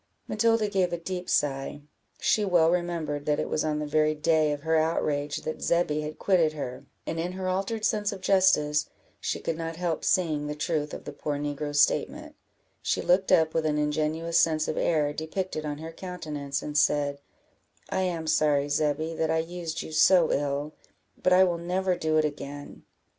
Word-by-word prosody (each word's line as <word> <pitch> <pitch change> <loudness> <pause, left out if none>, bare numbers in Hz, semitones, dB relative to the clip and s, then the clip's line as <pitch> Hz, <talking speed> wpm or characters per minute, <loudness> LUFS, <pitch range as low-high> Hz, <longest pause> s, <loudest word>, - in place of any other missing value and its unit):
Matilda 225 0 +2
gave 190 -3 +1
a 175 - -1
deep 180 +1 -5
sigh; 140 0 0 0.4
she 215 - +2
well 175 -4 +4
remembered 165 -5 -2
that 150 -1 +2
it - - -1
was 155 - -1
on 155 -1 0
the 150 - -2
very 155 +1 +2
day 155 0 +2
of 145 0 -4
her 160 0 +1
outrage 150 -2 0
that 155 - -5
Zebby 170 -3 +1
had 150 0 -6
quitted 170 -5 +2
her, 125 -4 -6 0.2
and 165 - -3
in 175 +2 -2
her 185 0 -4
altered 195 +4 -1
sense 210 0 +1
of 200 - -7
justice, 185 -6 +3 0.3
she - - -2
could 165 - -3
not 165 0 -4
help 170 -2 -2
seeing 155 -5 +1
the 150 - -4
truth 150 -1 -2
of - - -9
the 145 - -7
poor 145 0 -3
negro's 145 0 +1
statement; - - -1 0.5
she - - 0
looked 185 +2 +2
up, 160 -1 +4
with 165 - +1
an 150 -1 0
ingenuous 155 +2 0
sense 155 -1 +2
of - - -2
error 150 -3 +1
depicted 160 0 -4
on 145 -1 -3
her 160 +2 -7
countenance, 155 -6 -5
and 150 0 0
said 145 -1 +1 0.7
"I - - 0
am 175 -3 -2
sorry, 145 -2 +2
Zebby, 155 +2 0
that 160 -1 -1
I 160 - +2
used 165 0 -4
you - - -9
so 170 +1 +5
ill, 145 +1 -1 0.5
but 185 - +2
I 185 +1 +7
will 175 -2 +1
never 180 +2 0
do 155 -2 0
it 155 - +3
again." 145 -1 -7
160 Hz, 190 wpm, -27 LUFS, 150-175 Hz, 0.7 s, I